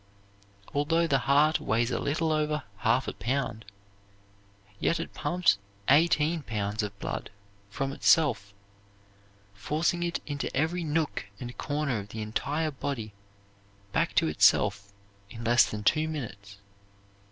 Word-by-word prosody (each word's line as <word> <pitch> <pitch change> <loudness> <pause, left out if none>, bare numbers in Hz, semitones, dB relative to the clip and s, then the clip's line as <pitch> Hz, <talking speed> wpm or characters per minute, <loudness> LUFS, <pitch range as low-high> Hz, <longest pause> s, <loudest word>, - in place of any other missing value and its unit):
Although 165 +4 +2
the 140 -4 +2
heart 150 +3 +4
weighs 115 +2 0
a - - 0
little 160 +3 0
over 150 -1 0
half 115 +5 +1
a - - -3
pound, 130 -4 -2 1.1
yet 165 - +1
it 165 - -5
pumps 175 - +2 0.3
eighteen 155 +2 +4
pounds 105 -3 -2
of 105 -1 -5
blood - - -4 0.4
from 135 +6 -3
itself, 130 -11 +3 1.0
forcing 155 +11 -1
it 175 0 -1
into 145 -2 -3
every 165 +4 0
nook 155 -8 -1
and 125 0 -7
corner 145 -5 -1
of 100 0 -9
the 110 - -6
entire 145 +8 -1
body, 125 -6 -4 0.8
back - - 0
to - - +4
itself 100 0 +3 0.4
in 115 +2 -9
less 120 0 +5
than 105 -1 -5
two 155 +7 +3
minutes. 100 -10 -7
140 Hz, 130 wpm, -28 LUFS, 110-155 Hz, 1.1 s, less